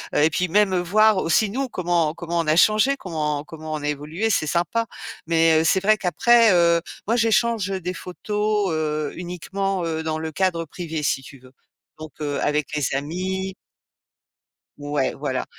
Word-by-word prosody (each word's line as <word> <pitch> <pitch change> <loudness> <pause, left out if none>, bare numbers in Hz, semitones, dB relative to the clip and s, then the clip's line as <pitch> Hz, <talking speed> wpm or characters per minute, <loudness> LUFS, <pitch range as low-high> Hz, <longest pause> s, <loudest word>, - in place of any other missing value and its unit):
heu 150 - +4
et 160 - +5
puis, 180 +3 -1
même, 190 +1 +2
voir 215 +3 +3
aussi 185 +4 +2
nous, 265 +5 -2
comment 170 -6 0
comment 170 0 -3
on 165 - -1
a 155 - +3
changés, 215 +9 +4
comment 150 - -3
comment 155 0 -8
on 150 - -4
a 145 - -1
évolués, 155 +9 -2
c'est 155 - +1
sympa. 175 +8 0 0.4
Mais 165 -1 +4
heu, - - +1
c'est 190 +3 +3
vrai 215 +2 +4
qu'après, 220 +4 +4
heu, 170 -1 +4 0.2
moi, 230 +3 +1
j'échange 230 -2 +2
des 185 -2 -3
photos, 210 +3 -2
heu, 155 -1 -2
uniquement, 180 +2 -3
heu, 160 -1 -2
dans 155 0 -2
le 160 0 -4
cadre 175 -1 0
privé, 160 -1 -6
si 135 - 0
tu 135 +1 -13
veux. 130 0 -18 0.5
Donc, 155 -2 -9
heu, 145 -1 -2
avec 150 -1 0
les 145 - 0
amis 185 +6 -3 1.2
Ouais, 145 -2 -1
voilà. 135 -3 -3
170 Hz, 175 wpm, -22 LUFS, 155-195 Hz, 1.2 s, et